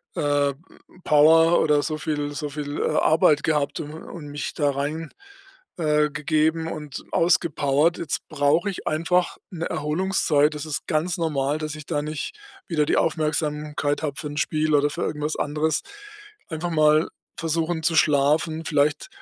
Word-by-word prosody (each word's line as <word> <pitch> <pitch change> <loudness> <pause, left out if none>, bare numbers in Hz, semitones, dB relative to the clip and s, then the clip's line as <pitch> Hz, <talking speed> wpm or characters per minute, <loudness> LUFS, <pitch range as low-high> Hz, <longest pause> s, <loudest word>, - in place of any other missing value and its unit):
äh, 145 -1 +1 0.5
Power 160 +3 +5
oder 150 -2 +3
so 155 -2 -2
viel 145 -1 -3
so 150 +1 -4
viel, 145 0 -5
äh, - - +1
Arbeit 155 -1 +4
gehabt 150 -3 0
u - - -5
und 155 +1 -9
mich 145 0 -5
da 145 -2 +1
rein 150 +3 -3 0.7
äh, 150 -2 +2
gegeben 155 +2 0
und 150 -3 -7
ausgepowert. 165 -2 +2
Jetzt 155 -3 -3
brauche 155 +5 +2
ich 195 - -7
einfach 170 +3 +1
'ne 170 -2 -4
Erholungszeit. 150 -2 +1
Das 150 0 -5
ist 155 -2 -4
ganz 165 +4 0
normal, 150 -3 0
dass 155 -1 -4
ich 155 -1 -10
da 150 -3 -1
nicht 155 - -5 0.3
wieder 155 -4 +1
die - - +1
Aufmerksamkeit 150 -1 -1
habe 145 -3 -2
für 155 - -4
'n 145 - -7
Spiel 155 0 +1
oder 145 0 +3
für - - -5
irgendwas 150 +1 -2
anderes.” 155 +2 0 0.7
Einfach 165 +2 -3
mal 155 0 +4 0.3
versuchen, 165 0 -1
zu 165 +1 +2
schlafen, 155 +2 +2
vielleicht 150 0 +1
155 Hz, 155 wpm, -24 LUFS, 145-160 Hz, 0.7 s, Power